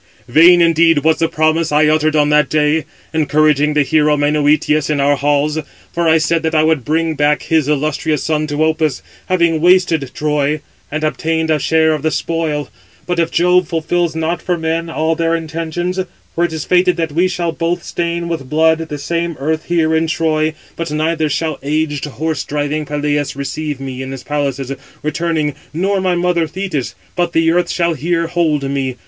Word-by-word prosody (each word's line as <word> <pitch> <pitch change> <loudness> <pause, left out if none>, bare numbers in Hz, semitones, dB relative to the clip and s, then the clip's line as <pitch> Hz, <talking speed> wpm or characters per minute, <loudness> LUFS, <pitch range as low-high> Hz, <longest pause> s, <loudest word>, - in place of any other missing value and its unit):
vain 170 +7 +6
indeed 165 -2 +4
was 160 0 +2
the 165 - +2
promise 155 0 +1
I 150 +1 +4
uttered 155 0 +2
on 150 -1 +3
that 150 0 +3
day, 150 +1 +1 0.3
encouraging 150 -1 +2
the 150 - +4
hero 150 +1 +2
Menœtius 150 0 +2
in 150 -2 0
our 140 +1 +3
halls; 145 +2 +1 0.3
for 170 -1 0
I 160 - +5
said 165 +1 +1
that 160 0 -1
I 155 - +4
would 155 -4 +1
bring 160 +3 0
back 150 0 +1
his 160 -3 +1
illustrious 150 0 0
son 155 -1 0
to 145 +1 0
Opus, 155 -4 0 0.2
having 170 -3 +2
wasted 175 -5 +3
Troy, 150 0 0 0.3
and 155 +1 -3
obtained 160 +1 0
a 155 - +2
share 160 +2 +2
of 155 - -3
the 160 - +1
spoil. 155 -2 -2 0.4
But 170 -2 0
Jove 180 0 +3
fulfils 165 0 -1
not 160 +1 -2
for 180 -2 -1
men 165 +1 -2
all 160 0 0
their 165 0 0
intentions; 165 +3 -3 0.3
for 170 - +1
it 165 - -4
is 160 -2 -4
fated 180 0 +3
that 165 -2 -1
we 170 +5 +2
shall 175 -2 -2
both 170 +1 -2
stain 170 0 -3
with 160 -6 -4
blood 160 +2 +3
the 160 -2 -5
same 170 +3 -2
earth 155 +3 -2
here 160 -2 +1
in 160 +1 +1
Troy; 155 -1 0 0.2
but 165 -1 -4
neither 155 +1 0
shall 155 +1 -2
aged 150 0 -1
horse 150 0 -3
driving 150 +1 -2
Peleus 145 -1 -1
receive 145 +1 -4
me 130 -1 -6
in 130 - -6
his 135 -1 -7
palaces, 140 -2 -2 0.3
returning, 155 -1 -1 0.2
nor 195 +3 0
my 185 -1 +1
mother 175 -2 +1
Thetis, 155 -5 -4 0.2
but 175 -1 -1
the 165 0 +3
earth 175 0 +1
shall 170 -1 0
here 165 +3 -1
hold 165 -4 0
me. 135 -2 -2
160 Hz, 185 wpm, -16 LUFS, 150-165 Hz, 0.4 s, vain